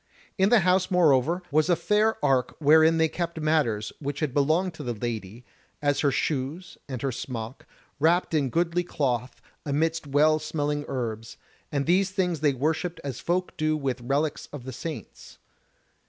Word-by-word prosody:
In 190 -1 +3
the 235 -2 +5
house, 185 +1 +2
moreover, 170 -1 +3
was 155 +3 +2
a 175 - +5
fair 210 +5 +2
ark 130 -3 +1
wherein 160 +2 +5
they 160 0 +4
kept 170 0 -4
matters 145 -9 0
which 145 -1 -4
had 150 -5 -1
belonged 160 +6 +2
to - - -9
the 120 -2 -3
Lady, 115 0 -5 0.3
as 145 -1 +1
her 145 - +3
shoes 150 +6 -2
and 130 -2 -5
her 135 - 0
smock, 120 -1 -6 0.3
wrapped 165 +4 +2
in 145 -4 +1
goodly 170 +3 0
cloth 125 -7 -2 0.2
amidst 155 +2 -1
well 155 +2 +3
smelling 150 -1 -2
herbs; 115 -4 -4 0.3
and 140 -1 -1
these 185 +3 +3
things 180 -4 -1
they 145 -1 +2
worshipped 160 +6 -1
as 135 -4 -5
folk 180 +1 -1
do 155 0 +1
with 135 -4 -3
relics 140 +5 -1
of 145 -4 -8
the 130 +1 -7
saints. 150 +5 -8
150 Hz, 170 wpm, -26 LUFS, 130-170 Hz, 0.3 s, the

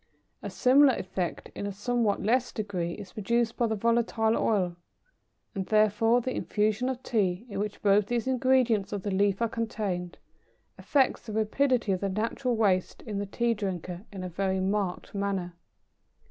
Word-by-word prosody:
A - - -5
similar 265 0 +5
effect, 185 -1 -4
in 200 - -4
a - - -3
somewhat 215 +1 0
less 245 +4 +2
degree, 185 -6 -3
is 195 -2 -10
produced 230 +2 0
by 235 - +1
the 220 - -1
volatile 230 0 +1
oil, 185 -5 +1 0.8
and, 190 -1 -4
therefore, 215 +2 +3
the 255 +2 -3
infusion 215 +4 0
of 260 -1 -4
Tea, 195 -2 0
in 200 -2 -4
which 210 0 -4
both 200 0 +4
these 240 +1 -1
ingredients 255 -6 +2
of 200 -2 -3
the 205 - -2
leaf 200 +2 +2
are - - +3
contained, 210 -6 -3 0.6
affects 270 -3 +1
the 215 - -5
rapidity 225 +1 +1
of 185 - 0
the 200 - 0
natural 230 +5 -1
waste 195 -5 +1
in 210 -4 -4
the 200 - -3
Tea 235 +4 0
drinker, 185 -4 -4
in 190 -2 -7
a - - -3
very 190 +2 -1
marked 190 -1 -2
manner. 195 -3 -2
210 Hz, 170 wpm, -28 LUFS, 195-235 Hz, 0.8 s, similar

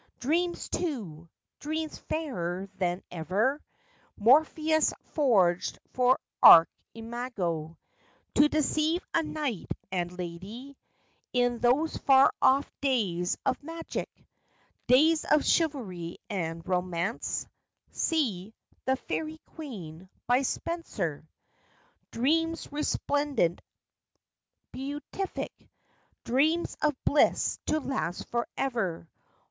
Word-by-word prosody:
Dreams, 345 +6 0
too! 190 - -4 0.3
Dreams, 315 +1 -4
fairer 190 - -3
than 180 0 -1
ever 200 - 0 0.6
Morpheus 310 +6 +4 0.2
forged 195 - +2 0.2
for 255 +1 +4 0.2
Archimago, 180 -3 +4 0.6
To 295 +1 +5
deceive 310 +3 +1
a 335 - +3
knight 295 - -4 0.2
and 180 -1 -2
lady, 195 +10 -7 0.6
In 245 -1 +2
those 265 +7 +2
far 270 0 +5
off 275 +2 +4
days 200 -11 0
of 260 - 0
magic; 330 +2 -5 0.8
Days 310 +5 +5
of 300 - +3
chivalry 205 - 0
and 165 -4 -3
romance; 180 +3 -1 0.5
(See 220 - -1
" - - -37
The 265 - +3
Faerie 310 +4 -4 0.2
Queen," 185 - -8 0.2
by 245 +2 +3
Spencer); 205 - -3 0.8
Dreams 325 +7 0
resplendent! 290 - 0 1.1
beatific! 290 +8 -5 0.7
Dreams 305 +8 +1
of 300 -2 +2
bliss 290 - +3
to 310 - +2
last 265 - -3
forever 235 -8 -2
250 Hz, 90 wpm, -28 LUFS, 180-300 Hz, 1.1 s, To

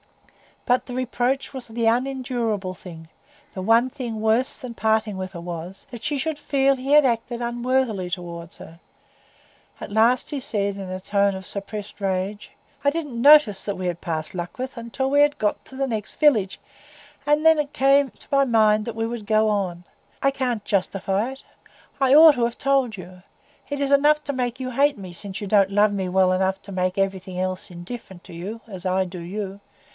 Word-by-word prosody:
But 250 +1 +2
the 250 - -6
reproach 255 +2 -1
was 260 -2 -7
the 230 0 -2
unendurable 240 -5 -1
thing; 165 -3 -12 0.4
the 190 - -5
one 230 +6 +4
thing 240 -5 -5
worse 220 +4 +1
than 250 -2 -7
parting 220 -2 0
with 185 0 -5
her 170 - -7
was, 175 +2 -7
that 240 -2 -9
she 300 -1 -1
should 305 +2 -2
feel 275 -2 +2
he 265 +2 -2
had 300 -1 +7
acted 235 0 -1
unworthily 240 -5 -1
toward 170 -2 -6
her. 165 +1 -13 1.0
At - - -8
last 230 +4 +3
he 290 - -2
said, 200 -5 -2
in 195 -2 -6
a 185 0 -4
tone 200 +1 +1
of 190 0 -8
suppressed 205 +1 -7
rage,— 195 +2 -2 0.3
"I 285 - +4
didn't 290 -6 -4
notice 285 -7 +6
that 200 - -2
we 185 -1 -3
had 175 -1 -3
passed 155 -2 -3
Luckreth 190 +9 -5 0.2
till 265 +2 -1
we 285 +1 +5
had 290 0 +3
got 210 -1 -1
to 265 - -13
the 270 0 -1
next 220 -4 -4
village; 220 -11 +3 0.7
and 295 +2 +2
then 320 -1 +6
it 295 -1 -2
came 275 +1 +4
into - - -13
my 275 0 +4
mind 215 -4 +3
that 235 - -5
we 225 0 -1
would 230 -2 -6
go 215 0 +3
on. 185 -4 -2 0.4
I 275 - +4
can't 250 -6 -2
justify 195 +3 0
it; 270 - -14 0.6
I 270 0 +5
ought 315 0 +9
to 245 - 0
have 235 0 -3
told 270 -6 +1
you. 180 0 -11 0.5
It 285 -1 -3
is 280 0 0
enough 300 +2 +4
to 285 - -2
make 250 -1 -2
you 255 -1 -4
hate 280 +2 +2
me, 185 -3 -9
since 195 +2 -6
you 205 - -4
don't 195 -1 +4
love 205 +1 +4
me 190 -2 -2
well 185 0 +3
enough 190 +1 0
to 200 - -10
make 185 0 -1
everything 190 -2 -2
else 185 0 -3
indifferent 180 +1 -9
to - - -12
you, 200 +7 -6
as 190 -5 -9
I 185 +1 +1
do 180 0 -8
you. 195 +3 -5
220 Hz, 200 wpm, -23 LUFS, 190-260 Hz, 1.0 s, ought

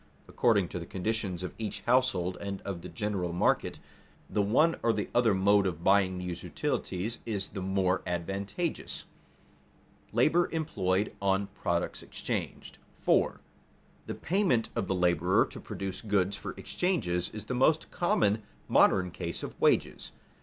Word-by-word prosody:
According 105 -7 +2
to 90 - -4
the 85 - -7
conditions 95 -2 -2
of 90 - -5
each 110 -2 -4
household 120 -8 +2
and 100 -1 -4
of 95 -4 -5
the - - -8
general 100 -6 -2
market, 90 - +1 0.5
the 105 - 0
one 140 +12 +3
or 115 - +3
the 105 -2 -2
other 115 -4 +4
mode 100 +1 +4
of 85 -2 -4
buying 95 -1 +4
these 90 -1 -4
utilities 105 +6 -2
is 100 -4 -3
the 95 - -6
more 95 0 +1
advantageous. 100 - -3 1.0
[Sidenote: - - -29
Labor 175 +3 +4
employed 105 - 0
on 100 0 +2
products - - -1
exchanged] - - -5 0.2
4. - - +2 0.7
_The - - -5
payment 175 - +1
of 95 - -1
the 95 - 0
laborer 90 0 +3
to - - -10
produce 95 -1 -5
goods 100 -2 +1
for - - -6
exchange 180 - -1
is 90 0 0 0.2
the 125 - -3
most 150 +5 +2
common 110 - +2 0.3
modern 90 -2 +4
case 85 0 -5
of - - -5
wages. - - +2
100 Hz, 150 wpm, -30 LUFS, 90-115 Hz, 1.0 s, other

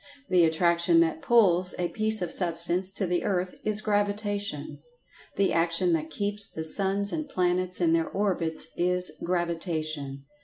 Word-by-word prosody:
The 180 -2 +4
attraction 170 +1 +2
that 160 -1 -1
"pulls" 185 -6 +3
a 175 -1 -2
piece 215 -2 +1
of 175 - -5
Substance 175 +1 0
to 195 - -2
the 175 0 -1
earth 185 -2 -2
is 215 0 +6
Gravitation. 205 -6 -2 0.6
The 200 -1 +1
attraction 170 +1 +2
that 160 -1 -2
keeps 205 +5 0
the 160 - -6
suns 195 +4 +1
and 310 -2 -5
planets 180 -2 -1
in 165 -2 +2
their 165 -1 0
orbits 180 -5 -1
is 180 +1 -1
Gravitation. 160 -5 -3
180 Hz, 150 wpm, -26 LUFS, 165-200 Hz, 0.6 s, is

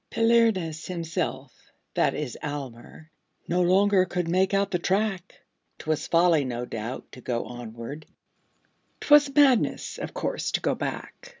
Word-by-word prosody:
Palinurus 225 -9 +2
himself 165 -6 -4 0.4
that - - +1
is 145 -6 -4
Almer 145 +1 -7 0.4
No 175 +2 +1
longer 190 +1 +4
could 180 -1 -3
make 185 +3 +2
out 200 0 +1
the 180 - 0
track; 190 0 -1 0.4
'Twas 155 -1 -2
folly, 165 -3 +4
no 120 -2 -4
doubt, 115 +2 -6
to 125 - -12
go 120 -1 -2
onward; 120 +5 -8 0.9
'Twas 295 -1 +5
madness, 275 -5 +3
of - - -6
course, - - -2
to - - +2
go - - 0
back. - - -6
170 Hz, 135 wpm, -26 LUFS, 135-195 Hz, 0.9 s, Twas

